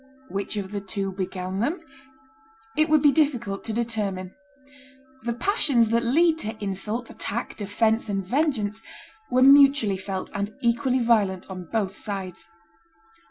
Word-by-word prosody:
Which 200 +2 -3
of 195 -1 -4
the 205 -1 -3
two 195 0 -3
began 185 0 -4
them? 295 - 0 1.0
It 310 +1 +2
would 310 -1 +4
be 290 - +7
difficult 250 -9 0
to 225 - -3
determine. 210 -5 -2 0.9
The 235 +1 -2
passions 245 - +2
that 235 +1 +2
lead 320 +7 +3
to 220 -5 -5
insult, 210 +4 -3
attack, - - -4
defence, 220 +2 0
and 195 -2 -2
vengeance 225 - 0 0.5
were 255 +1 +4
mutually 275 -7 +6
felt 190 0 -5
and 205 +1 -3
equally 240 +2 +1
violent 200 -6 +1
on 185 -1 -6
both 200 0 -2
sides. 195 -4 -5
220 Hz, 140 wpm, -25 LUFS, 195-250 Hz, 1.0 s, be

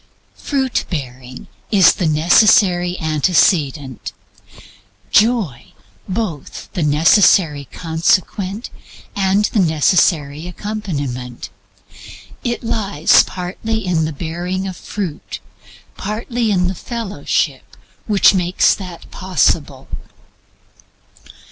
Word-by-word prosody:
Fruit 265 -3 -1
bearing 130 -5 -7 0.2
is 195 -5 +6
the 175 - -1
necessary 175 +2 +4
antecedent; 155 - +1 1.0
Joy 210 - +1 0.4
both 185 -7 -5
the 180 - -2
necessary 150 0 +4
consequent 185 +5 -1 0.4
and 195 +1 +2
the 215 - +2
necessary 160 -2 +2
accompaniment. 145 - -5 0.9
It 240 -1 -3
lay 205 -8 -4 0.2
partly 195 +4 -4
in 165 -3 +1
the 155 - -3
bearing 180 +5 -4
fruit, 180 -2 -6 0.6
partly 225 +3 -3
in 180 -3 +1
the 185 - -2
fellowship 225 +1 -3 0.3
which 205 -2 +5
made 180 -1 -2 0.2
that 180 -4 -9
possible. 150 -7 0
180 Hz, 85 wpm, -18 LUFS, 155-205 Hz, 1.0 s, is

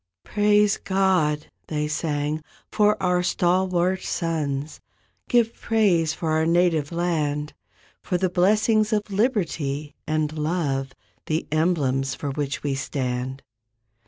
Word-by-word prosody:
"Praise 210 -1 +3
God," 180 -6 +1 0.2
they 150 -1 -1
sang, 150 0 -2 0.3
"for 210 -1 +3
our 180 -1 +2
stalwart 180 +1 +1
sons, 155 -4 -2 0.5
Give 235 -2 +3
praise 190 -8 +2
for 160 0 -3
our 160 +1 +2
native 170 -3 +2
land. 155 -4 -1 0.5
For 180 - -1
the 185 +1 +1
blessings 215 +4 +3
of 210 -1 -1
liberty 165 - -1
and 155 0 0
love— 150 -4 -1 0.3
The 155 +1 -1
emblems 140 -5 +1
for 145 - -4
which 140 -1 -3
we 145 -2 0
stand." 130 -1 -3
165 Hz, 115 wpm, -24 LUFS, 150-185 Hz, 0.5 s, Praise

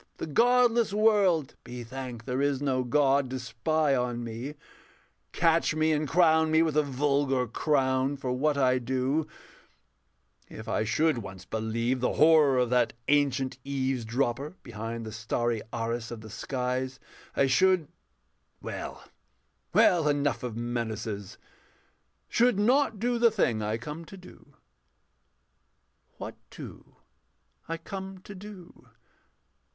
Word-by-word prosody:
The - - -4
godless 235 - +3
world 205 -8 +3
Be 120 0 -7
thanked 125 -1 -7
there 125 +1 -1
is 140 -2 +1
no 130 -3 0
God 135 +1 +2
to 130 0 -4
spy 135 +5 0
on 120 -1 -1
me, 120 +6 -6 0.8
Catch 165 -1 +2
me 155 0 +2
and 150 0 0
crown 160 0 +4
me 160 +1 +4
with 160 -3 -1
a 155 - +5
vulgar 140 -2 +1
crown 130 +1 +1
For 130 -2 -3
what 140 +3 +1
I 130 -2 +3
do: 130 +5 -1 1.2
if - - -9
I - - 0
should 150 +4 +2
once 95 -3 -9
believe 115 +4 -1
The 125 - 0
horror 155 -4 +5
of 125 -1 +1
that 125 -2 +2 0.2
ancient 135 -3 +1
Eavesdropper 135 +1 -2
Behind 115 0 -6
the 110 - -6
starry 115 +1 -1
arras 115 0 -3
of 120 -2 -7
the 110 -1 -11
skies, 130 +2 -3 0.4
I 140 - +3
should 180 +4 +3 0.7
well, - - -6 0.7
well, 165 -4 +4
enough 145 -2 +1
of 120 -3 -5
menaces 110 -4 -4 0.9
should 240 -2 +3
not 240 +2 +3
do 240 +3 0
the 235 0 +6
thing 125 - 0
I 105 +1 -1
come 150 +8 -7
to 195 - -11
do. 185 - -16 1.6
What - - -6 0.2
do - - -11 0.7
I 165 - -2
come 190 +3 -7
to 205 - -9
do? 190 -2 -12
135 Hz, 135 wpm, -28 LUFS, 120-160 Hz, 1.6 s, the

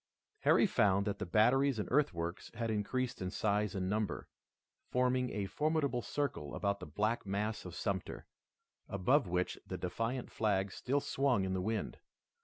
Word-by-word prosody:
Harry - - +5
found 100 -1 +3
that 100 - -2
the 105 - -3
batteries 125 +7 +4
and 105 - -2
earthworks 85 - 0
had 115 0 -1
increased 120 +4 -1
in 90 - -1
size 105 0 0
and 95 -1 -1
number, 105 +2 -1 0.6
forming 125 0 +2
a 100 -2 -2
formidable 145 - 0
circle 115 - -3
about 100 -1 0
the - - -7
black 105 +9 0
mass 105 +2 -2
of 90 -1 -7
Sumter, 95 -2 -3 0.6
above 105 +7 +3
which 90 +1 -1
the - - -4
defiant 120 +2 -3
flag 100 -3 +1
still 140 +7 0
swung 130 -10 +1
in 95 - -1
the 95 - 0
wind. 110 +3 -2
105 Hz, 160 wpm, -34 LUFS, 95-125 Hz, 0.6 s, Harry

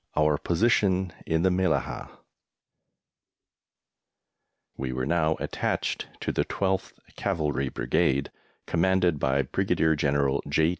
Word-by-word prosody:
OUR 75 -1 +3
POSITION 95 -2 +2
IN 80 +1 +1
THE 95 - +4
MELLAHAH. 95 +1 0 2.7
We 65 -1 -3
were 65 0 -2
now 80 0 +2
attached - - -2
to - - -1
the - - +1
12th 95 -1 -1 0.2
Cavalry 75 -8 -1
Brigade, 70 -1 0 0.3
commanded 90 -2 +2
by 70 +1 +2
Brigadier 80 +4 +1
General 70 -1 +1
J. 80 +2 +3
80 Hz, 105 wpm, -27 LUFS, 70-90 Hz, 2.7 s, THE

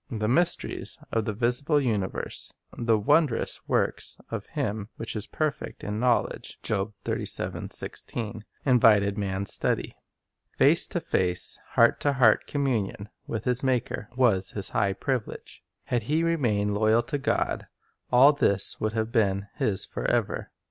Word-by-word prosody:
The 110 -3 -2
mysteries 170 +9 0
of 115 -2 0
the 110 - -2
visible 125 +7 +3
universe 110 -8 -2
— - - -53
the 115 -2 +2
"wondrous 120 +4 +2
works - - 0
of - - -4
Him 105 0 -3
who - - -6
is 110 -1 -4
perfect 155 -2 -3
in 105 +1 -3
knowl 125 0 +3
edge" - - -10
2 100 +2 -1
— 110 -2 -5
invited 110 -6 +4
man's 95 0 -3
study. - - -1 0.6
Face - - +5
to - - -2
face, 90 -1 +1
heart - - +5
to 145 - +1
heart 120 -5 +4
communion 115 -8 -1 0.2
with 115 -2 -3
his 125 +1 0
Maker 125 -3 -1
was 105 -7 +3
his 100 -2 -3
high 100 -3 +1
privilege. 130 +2 -4 0.2
Had 120 - -1
he 150 +9 0
remained 120 -12 +1
loyal 110 +3 +3
to 145 +4 -3
God, - - -1 0.4
all 135 +4 +7
this 100 -9 +1
would 110 0 -1
have 110 0 -1
been 100 -4 +1
his 100 -3 0
forever. - - -1
110 Hz, 145 wpm, -27 LUFS, 105-130 Hz, 0.6 s, all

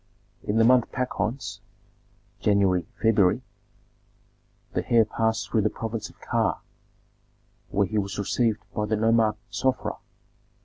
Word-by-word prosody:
In 105 - -1
the 115 - +5
month 125 0 +4
Pachons 120 -3 -3 0.8
(January, 95 -4 +2
February) 110 +1 +3 1.3
the - - -3
heir 115 -2 +6
passed 110 +1 -1
through 110 - +3
the 105 - +2
province 110 -1 -5
of - - -20
Ka, - - 0 1.1
where 100 0 +2
he 110 +2 -1
was 100 0 -3
received 110 +1 0
by 105 0 -1
the 110 - +1
nomarch 110 0 +3
Sofra. 130 +6 -1
110 Hz, 125 wpm, -26 LUFS, 105-115 Hz, 1.3 s, heir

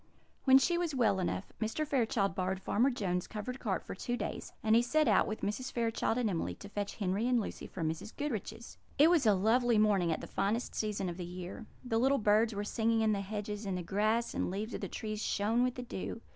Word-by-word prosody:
When 265 -1 +8
she 345 +5 +2
was 335 -5 -1
well 215 -6 +3
enough, 185 +1 -3
Mr. 225 +8 -1
Fairchild 230 - +1
borrowed 185 0 -1
Farmer 235 +7 +2
Jones's 185 -8 -2
covered 245 +5 -5
cart 190 -6 -2
for - - -6
two 240 +6 -3
days; - - -5
and 220 0 +4
he 235 - +6
set 305 +6 +2
out, - - +4
with 215 - -4
Mrs. 250 +6 -2
Fairchild 230 -1 0
and 245 -2 +1
Emily, 175 -5 -2
to 200 - -11
fetch 205 0 -4
Henry 200 +3 0
and 250 -1 +3
Lucy 215 - -5
from 165 -4 -3
Mrs. 160 +7 -4
Goodriche's. 235 -4 -5 0.2
It 310 +4 +7
was 310 -9 +4
a 210 - +6
lovely 230 +4 +3
morning 200 -5 +3
at 160 - -1
the - - -7
finest 210 +5 -1
season 210 -3 -2
of 175 -1 -4
the 180 - -4
year. 180 +5 -7 0.2
The 225 -2 +1
little 270 +3 +3
birds 215 0 +3
were 205 - -2
singing 225 +1 +1
in 220 -1 +3
the 200 -2 0
hedges, 210 +1 -4
and 195 -3 -2
the 180 - -4
grass 215 +6 +1
and - - -1
leaves 210 +5 -4
of - - -4
the - - -2
trees 215 -1 -4
shone 220 +4 +1
with 250 -1 0
the 250 - -5
dew. 230 -1 -5
215 Hz, 235 wpm, -32 LUFS, 195-240 Hz, 0.2 s, When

